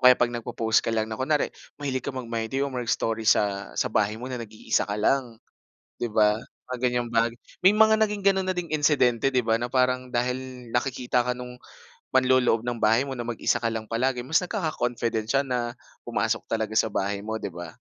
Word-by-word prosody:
kaya 125 - +7
'pag 120 -1 +1
nagpo-post 115 -1 +1
ka - - -5
lang 110 -1 +1
na 110 - -6
kunwari, 145 +3 +1 0.2
mahilig 135 -3 -2
ka 125 - -6
mag-My 115 -4 -3
Day 135 +4 0
or 140 - -4
mag-story 115 -3 -1
sa 100 -1 +1
sa 130 - 0
bahay 105 0 +1
mo 120 - -8
na 125 - -4
nag-iisa 110 -2 -2
ka 100 - -2
lang, 120 +2 +1 0.6
di 120 - -1
ba? 105 -1 +3 0.3
Mga 125 - -3
ganyang 120 -1 +1
bagay 115 0 +2 0.3
may 190 +3 +6
mga 220 0 +6
naging 210 -2 0
gano'n 190 -1 +3
na 185 - 0
ding 175 -3 -4
insidente, 135 -4 +3
di 125 - +3
ba, 115 0 +2
na 120 - -2
parang 130 0 +1
dahil 125 0 -3
nakikita 125 0 0
ka 125 - +1
nung 125 0 -9 0.5
manloloob 130 -3 +4
ng 120 +1 -3
bahay 115 +5 +4
mo 135 - -4
na 120 - -4
mag-isa 115 -1 0
ka 115 -1 0
lang 110 -1 -5
palagi, 125 +2 0
mas 150 +7 +2
nagkaka-confident 120 - -2
siya 135 - +4
na 120 -2 -1 0.3
pumasok - - -1 0.3
sa 110 -1 +2
bahay 100 +1 -2
mo, 110 0 -3
di - - -3
ba? 85 -1 -8
120 Hz, 200 wpm, -26 LUFS, 115-130 Hz, 0.6 s, kaya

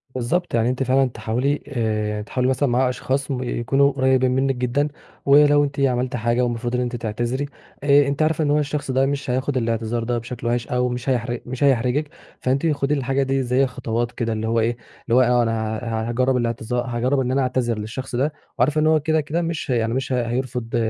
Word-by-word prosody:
بالضبط 165 +9 -1
يعني 115 +1 +2
أنتِ 130 +1 -1
فعلًا 130 +1 +3
تحاولي 120 +6 -1
آآ 110 -5 -1
تحاولي 125 +4 -1
مثلًا 130 +1 +1
مع 125 +1 +2
أشخاص 135 +2 -2
يكونوا 130 +2 +1
قريبين 130 -1 +2
منِك 135 0 +1
جدًا، 125 +4 0 0.4
ولو 145 +1 +6
أنتِ 140 -1 -3
عملتِ 125 -2 +1
حاجة 120 +1 +1
ومفروض 120 0 -2
إن 125 - +1
أنتِ 125 0 -2
تعتذري 120 +4 -2 0.4
آآ 145 0 +5
أنتِ 140 +2 -1
عارفة 155 0 +2
إن 145 - +1
هو 150 - +3
الشخص 150 -1 -2
ده 130 +1 +3
مش 140 -1 -2
هياخد 130 +2 0
الاعتذار 115 -1 -1
ده 120 +1 -1
بشكل 120 +1 -5
وِحِش 120 0 0
أو 125 0 0
مش 125 +2 -3
هيح 120 -1 0
مش 130 +2 -4
هيحرجِك، 135 +2 +2 0.3
فأنتِ 135 +5 +1
خدي 145 0 0
الحاجة 135 0 0
دي 135 0 0
زي 125 +2 +2
خطوات 120 -2 -2
كده 115 -2 -2
اللي 110 0 -3
هو 115 +1 +1
إيه، 115 +1 0 0.3
اللي 115 - +2
هو 130 - +6
آه 125 0 +3
أ 120 - +4
أنا 110 -1 -1
ه 115 -1 -2
هاجرَّب 130 +2 +1
الاعتذا 120 0 -2
هاجرَّب 120 +2 0
إن 130 -1 0
أنا 135 - +2
أعتذر 125 -3 0
للشخص 120 +5 -5
ده 140 +5 0 0.3
وعارفة 150 +5 +3
إن 155 - +3
هو 155 0 +4
كده 160 +1 +1
كده 155 +4 -2
مش 165 -3 -3
يعني 115 -2 +1
مش 130 0 -2
هيرفض 125 -1 -2
125 Hz, 210 wpm, -22 LUFS, 120-140 Hz, 0.4 s, ولو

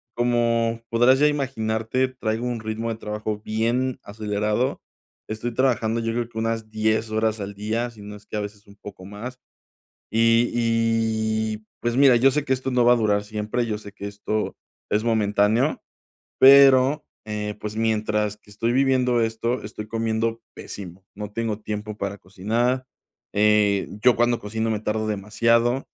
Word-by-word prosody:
como 115 -1 +1
podrás 120 +3 +4
ya 150 - +5
imaginarte, 130 -3 -1
traigo 115 -2 -3
un 120 -2 -2
ritmo 110 +1 -3
de 115 - -2
trabajo 105 0 -4
bien 120 +4 0
acelerado. 105 +3 -1 0.5
Estoy 110 +2 -4
trabajando 115 -3 +1
yo 115 0 -1
creo 120 -1 -1
que 110 - -12
unas 115 -1 -2
10 110 +1 0
horas 110 0 0
al 100 0 -5
día, 110 +4 -2
si 110 -3 -15
no 105 0 -8
es 105 0 -15
que - - -7
a - - -1
veces 105 0 -8
un 100 - -16
poco 95 -2 -11
más, 115 +6 -8 0.7
y 115 +1 +4
y, 110 -2 0 0.2
pues, 120 0 -1
mira, 135 -3 +7
yo 135 +3 +5
sé 150 +1 0
que 130 - -4
esto 130 0 -2
no 125 -1 +3
va 120 - +6
a - - +4
durar 105 -2 +1
siempre. 110 +3 -2
Yo 105 -2 -2
sé 105 -1 -11
que 100 - -8
esto 105 +1 -3 0.4
es 105 +1 +2
momentáneo, 110 +4 +2 0.6
pero, 135 +1 +7 0.2
eh, 105 -1 -4
pues, 105 0 -5
mientras 105 -1 0
que 105 - -21
estoy 115 +3 -1
viviendo 130 -2 +2
esto, 115 +2 -1
estoy 105 0 -7
comiendo 115 0 -1
pésimo. 95 -1 -9
No 105 0 -7
tengo 110 -2 -2
tiempo 105 0 -5
para 100 0 -4
cocinar, 115 +7 -1 0.5
eh, 105 -1 +3
yo 125 -1 +5
cuando 120 0 +2
cocino 110 +2 -2
me 105 -1 -1
tardo 110 0 -1
demasiado. 115 +5 +1
110 Hz, 165 wpm, -23 LUFS, 105-120 Hz, 0.7 s, mira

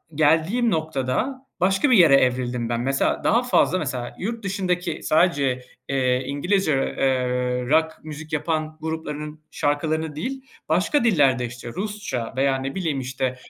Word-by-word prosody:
geldiğim 165 +10 +3
noktada 160 - -2
başka 195 - +2
bir 235 - +7
yere 165 -7 +7
evrildim 125 -2 +1
ben. 120 0 -1
Mesela, 135 +2 0
daha 235 +3 +3
fazla 215 -6 +2
mesela 130 -5 -4
yurt 225 +3 -4
dışındaki 180 -3 -2
sadece, 140 -6 +2 0.3
eee, 130 -2 +1
İngilizce, 160 +5 +1
eee, 125 -2 0
rock 160 +1 +2
müzik 155 +1 -8
yapan 155 0 -1
gruplarının 155 -1 -5
şarkılarını 155 +1 -1
değil 265 - -4 0.3
başka 185 - +2
dillerde, 140 - +3
işte, 120 0 -8
Rusça 200 - -4
veya 135 0 +2
ne 135 +1 -4
bileyim, 160 -7 -1
işte, 130 0 -2
155 Hz, 140 wpm, -23 LUFS, 130-180 Hz, 0.3 s, bir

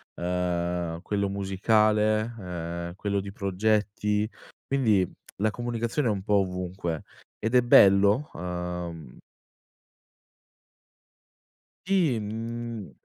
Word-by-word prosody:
ehm, 85 -1 -1
quello 100 -1 -1
musicale, 110 +3 +2
ehm, 85 -2 -5
quello 100 0 -1
di 100 0 -6
progetti, 105 +1 0 0.4
quindi 110 -10 +2 0.3
la 110 +2 +1
comunicazione 120 +3 -2
è 110 - +3
un 95 -2 -3
po' 105 0 +2
ovunque, 90 -3 -3 0.4
ed 115 +2 -2
è 125 - +7
bello, 100 +3 +6
uhm 90 -4 -5 2.7
Sì, 175 -11 +2
mhmm, 115 0 -5
100 Hz, 90 wpm, -27 LUFS, 90-110 Hz, 2.7 s, è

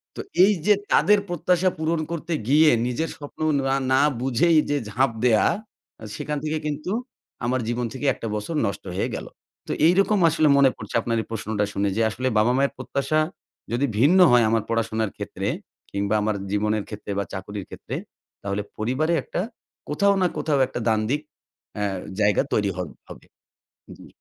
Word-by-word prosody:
তো - - -9 0.2
এইযে 200 0 +4 0.2
তাদের 210 0 +5
প্রত্যাশা 180 +1 +2
পূরণ 160 +1 0
করতে 170 0 -3 0.2
গিয়ে 155 +2 +6 0.2
নিজের 140 +6 -2
স্বপ্ন 145 +1 -11 0.3
না 135 - +2 0.2
না 135 - +5 0.2
বুঝেই 150 +6 +3
যে 145 - +2
ঝাঁপ 130 +4 +2
দেয়া 110 -3 +4 0.7
সেখান 150 0 -3
থেকে 155 0 -1
কিন্তু 150 +4 -3 0.5
আমার 130 +2 +1
জীবন 120 +1 -1
থেকে 135 +2 -5
একটা 115 - -6
বছর 105 +10 -4
নষ্ট 100 -1 -3
হয়ে 95 - -1
গেলো। - - -7 0.4
তো - - -3 0.2
এইরকম 195 +4 +3
আসলে 155 -1 +2
মনে 140 -1 +6
পড়ছে 110 - -8
আপনার 115 0 -1
এই - - -11
প্রশ্নটা 105 -1 -1
শুনে 100 0 0
যে - - +2
আসলে 125 +4 -3
বাবা-মায়ের 125 +6 +2
প্রত্যাশা 145 +3 -1 0.5
যদি 120 +4 +1
ভিন্ন 165 +9 +5
হয় 120 -1 +6
আমার 115 -1 +1
পড়াশোনার 110 -2 0
ক্ষেত্রে - - -4 0.4
কিংবা 100 +1 -1
আমার 105 0 0 0.2
জীবনের 105 +1 0
ক্ষেত্রে 105 -1 -7
বা 100 - +1
চাকরির 100 0 -6
ক্ষেত্রে - - -7 0.5
তাহলে 100 +1 -2 0.2
পরিবারে 130 +10 0
একটা - - -3 0.5
কোথাও 200 +7 +3
না 180 - +4
কোথাও 150 -2 +1
একটা - - -5
দ্বান্দ্বিক 110 +6 +1 0.6
আ - - +1 0.4
জায়গা 105 -1 +3
তৈরি 100 -2 +1
হ - - -11 0.3
হবে। - - -12 0.7
জি। - - -14
130 Hz, 165 wpm, -24 LUFS, 110-155 Hz, 0.7 s, গিয়ে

